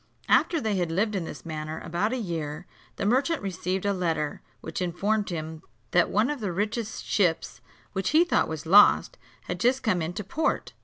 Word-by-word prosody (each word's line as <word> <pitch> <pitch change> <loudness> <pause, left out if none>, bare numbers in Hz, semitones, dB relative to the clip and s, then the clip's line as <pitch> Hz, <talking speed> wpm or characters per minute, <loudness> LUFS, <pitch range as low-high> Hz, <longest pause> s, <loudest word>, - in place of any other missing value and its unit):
After 335 - +4
they 220 -6 -1
had 175 -2 0
lived 210 +6 +1
in 180 -4 -2
this - - -9
manner 155 0 -5
about 175 +6 -1
a 260 - -1
year, 165 -6 -4 0.3
the - - -3
merchant 275 +9 +2
received 190 0 -3
a 200 - +2
letter, 165 -5 -2 0.2
which - - -5
informed 200 +4 0
him 160 -2 -5 0.3
that 175 -1 +4
one 215 +7 +2
of 295 - -4
the 205 -5 -2
richest 210 +4 -3
ships, 175 -6 0 0.3
which 190 0 -1
he 315 +3 +5
thought 350 - +1
was 160 -1 -5
lost, 200 +5 +6 0.2
had - - -5
just 255 +2 +2
come 210 -7 +1
into 175 +6 -3
port. 310 - -1
190 Hz, 190 wpm, -26 LUFS, 165-220 Hz, 0.3 s, lost